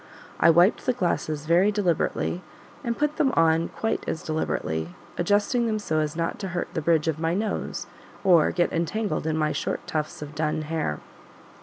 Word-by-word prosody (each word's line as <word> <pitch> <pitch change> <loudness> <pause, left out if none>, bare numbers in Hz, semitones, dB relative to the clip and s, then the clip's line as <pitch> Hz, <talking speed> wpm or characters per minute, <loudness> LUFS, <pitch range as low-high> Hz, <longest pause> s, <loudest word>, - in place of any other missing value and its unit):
I - - +6
wiped 175 +9 +4
the 255 - +4
glasses 155 -8 -1
very 175 +6 +4
deliberately, 180 -2 0 0.4
and 235 -1 -2
put 300 +1 0
them 270 -3 +3
on 165 0 +3
quite 225 - -2
as 160 - -3
deliberately; 85 - -2 0.2
adjusting 205 +6 +2
them 215 -1 0
so 155 -7 -1
as 150 0 -1
not 165 0 -2
to 195 - -3
hurt - - -2
the 160 - -1
bridge 160 0 +2
of 160 -1 0
my 165 +1 0
nose 210 +2 -2 0.4
or 175 -5 +5
get 175 -1 0
entangled 170 0 -1
in 160 0 0
my 155 -1 +1
short - - -3
tufts 150 -1 -3
of 150 0 -9
dun 155 0 -1
hair. 155 - -2
165 Hz, 180 wpm, -25 LUFS, 155-205 Hz, 0.4 s, I